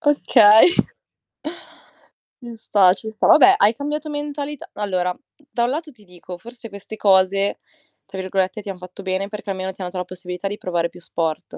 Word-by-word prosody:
Okay. 240 Hz, -8 st, +6 dB, 1.7 s
Ci 240 Hz, -1 st, -9 dB
sta, 195 Hz, -4 st, +4 dB
ci 220 Hz, +3 st, -7 dB
sta. 220 Hz, -, -1 dB
Vabbè 275 Hz, -4 st, +7 dB
hai 205 Hz, +3 st, +4 dB
cambiato 295 Hz, +4 st, -4 dB
mentalità 290 Hz, -1 st, -5 dB
allora, 185 Hz, -3 st, -2 dB, 0.3 s
da 235 Hz, -, 0 dB
un 240 Hz, -, +1 dB
lato 305 Hz, +3 st, -4 dB
ti 220 Hz, -6 st, -22 dB
dico, 180 Hz, -1 st, -11 dB
forse 235 Hz, +3 st, -11 dB
queste 200 Hz, +2 st, -10 dB
cose 195 Hz, 0 st, +3 dB, 0.5 s
tra 195 Hz, 0 st, -8 dB
virgolette 190 Hz, +1 st, -1 dB
"ti 205 Hz, -, -9 dB
han 195 Hz, -, -5 dB
fatto 180 Hz, +2 st, -11 dB
bene" 190 Hz, +1 st, -2 dB
perché 210 Hz, 0 st, -8 dB
almeno 190 Hz, 0 st, -4 dB
ti 190 Hz, -, -21 dB
hanno 180 Hz, -, -3 dB
dato 185 Hz, -, -8 dB
la 180 Hz, -, -1 dB
possibilità 180 Hz, +1 st, -6 dB
di 205 Hz, +1 st, -4 dB
provare 170 Hz, -3 st, -2 dB
più -, -, -15 dB
sport. 165 Hz, -2 st, -4 dB
200 Hz, 180 wpm, -21 LUFS, 185-235 Hz, 1.7 s, Vabbè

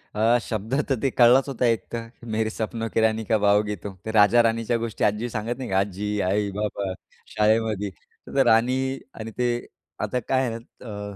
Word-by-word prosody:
अ, 115 Hz, +3 st, +4 dB
शब्द 110 Hz, +1 st, -4 dB, 0.2 s
तर 135 Hz, -, +3 dB
ते 135 Hz, -, +2 dB
कळलाच 125 Hz, +2 st, +5 dB
होता 125 Hz, -2 st, -1 dB
एक, 115 Hz, -2 st, +2 dB
तर 115 Hz, -1 st, -4 dB, 0.3 s
मेरे 110 Hz, 0 st, +1 dB
सपनो 115 Hz, +1 st, -3 dB
की -, -, +2 dB
रानी 110 Hz, 0 st, +2 dB
कब 110 Hz, -2 st, +2 dB
आओगी 105 Hz, +1 st, +3 dB
तूम. 100 Hz, -2 st, -6 dB
ते 110 Hz, -, -2 dB
राजा 110 Hz, +2 st, +6 dB
राणीच्या 115 Hz, +1 st, +1 dB
गोष्टी 115 Hz, -2 st, -3 dB
आजी 105 Hz, +4 st, +1 dB
सांगत 115 Hz, +2 st, -3 dB
नाही 130 Hz, -2 st, -5 dB
का, 95 Hz, -, +1 dB
आजी, 100 Hz, +1 st, -2 dB, 0.2 s
आई, 100 Hz, +1 st, +1 dB
बाबा, 100 Hz, -1 st, -3 dB, 0.4 s
शाळेमध्ये 105 Hz, -1 st, +1 dB, 0.4 s
तर 135 Hz, -1 st, +2 dB
राणी 130 Hz, +4 st, +2 dB, 0.2 s
आणि 110 Hz, 0 st, -6 dB
ते 125 Hz, 0 st, +1 dB, 0.6 s
आता 125 Hz, -, -1 dB
काय 130 Hz, -1 st, +2 dB
आहे 115 Hz, -1 st, -3 dB
ना 115 Hz, +1 st, -15 dB, 0.2 s
अ, -, -, -11 dB
110 Hz, 195 wpm, -24 LUFS, 105-120 Hz, 0.6 s, राजा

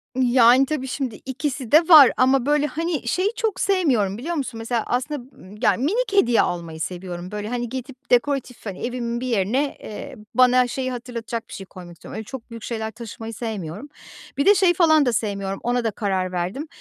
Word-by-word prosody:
Yani, 250 Hz, 0 st, +5 dB
tabii 270 Hz, -2 st, -3 dB
şimdi 255 Hz, -3 st, -3 dB
ikisi 270 Hz, -2 st, -4 dB
de 310 Hz, -, +9 dB
var. 305 Hz, -7 st, +9 dB
Ama, 260 Hz, 0 st, +3 dB
böyle, 295 Hz, +1 st, +2 dB
hani, 325 Hz, -4 st, -3 dB
şeyi 370 Hz, -, +1 dB
çok 440 Hz, -5 st, -2 dB
sevmiyorum 255 Hz, -, +1 dB
biliyor 325 Hz, +9 st, -4 dB
musun? 260 Hz, -6 st, -4 dB
Mesela 225 Hz, 0 st, -2 dB
aslında 255 Hz, +3 st, -2 dB, 0.3 s
y 210 Hz, -, -12 dB
ya -, -, +3 dB
minik 410 Hz, -, -1 dB
hediye 245 Hz, -, +4 dB
almayı 170 Hz, -2 st, -3 dB
seviyorum. 180 Hz, +1 st, -5 dB
Böyle, 210 Hz, 0 st, -4 dB
hani, 240 Hz, -1 st, -3 dB
gidip 260 Hz, +1 st, -8 dB
dekoratif, 250 Hz, -1 st, 0 dB
hani, 195 Hz, -3 st, -6 dB
evimin 240 Hz, -1 st, -3 dB
bir 255 Hz, -, -3 dB
yerine, 245 Hz, +6 st, 0 dB
eee, 215 Hz, -, -8 dB, 0.2 s
bana 255 Hz, 0 st, +5 dB
şeyi 255 Hz, +1 st, -3 dB
hatırlatacak 235 Hz, -2 st, -5 dB
bir -, -, -10 dB
şey 195 Hz, -, -7 dB
koymak 180 Hz, -2 st, -12 dB
istiyorum. 170 Hz, -, -11 dB
Öyle 220 Hz, -, -5 dB
çok 255 Hz, +1 st, -9 dB
büyük 230 Hz, -2 st, -9 dB
şeyler 220 Hz, -2 st, -4 dB
taşımayı 225 Hz, 0 st, -8 dB
sevmiyorum. 215 Hz, -, -6 dB, 0.5 s
Bir 280 Hz, -, +1 dB
de 410 Hz, -, +7 dB
şeyi 370 Hz, -2 st, +4 dB
falan 315 Hz, -4 st, +4 dB
da 245 Hz, -, +1 dB
sevmiyorum, 200 Hz, -2 st, -2 dB
ona 245 Hz, 0 st, 0 dB
da 225 Hz, -, 0 dB
karar 190 Hz, -3 st, -2 dB
verdim. 185 Hz, -, -3 dB
245 Hz, 195 wpm, -22 LUFS, 215-275 Hz, 0.5 s, de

